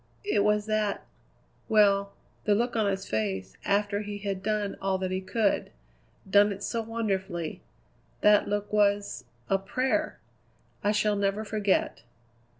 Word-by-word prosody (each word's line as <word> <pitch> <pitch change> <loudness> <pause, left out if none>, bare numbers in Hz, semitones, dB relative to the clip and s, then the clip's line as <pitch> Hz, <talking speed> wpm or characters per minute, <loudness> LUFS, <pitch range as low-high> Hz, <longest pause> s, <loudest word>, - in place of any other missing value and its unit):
"It 405 - +2
was 210 0 +2
that 215 -2 -1 0.6
well, 200 -2 +4 0.3
the 210 - +4
look 240 +3 0
on 215 -3 +2
his 195 0 -3
face 95 -4 -2
after 205 0 +1
he 205 -1 -5
had 200 -2 -3
done 210 0 -1
all 195 -1 +1
that 185 0 -3
he 185 0 -1
could 205 +2 0 0.6
done 205 +1 +5
it 200 0 -6
so 230 - -1
wonderfully. 195 -7 -3 0.6
That 210 0 +5
look 205 0 -2
was 205 -4 +1 0.2
a 195 - +2
prayer! 255 +7 -1 0.7
I 205 - +3
shall 210 0 +2
never 200 +2 0
forget." 205 -2 0
205 Hz, 145 wpm, -28 LUFS, 195-210 Hz, 0.7 s, done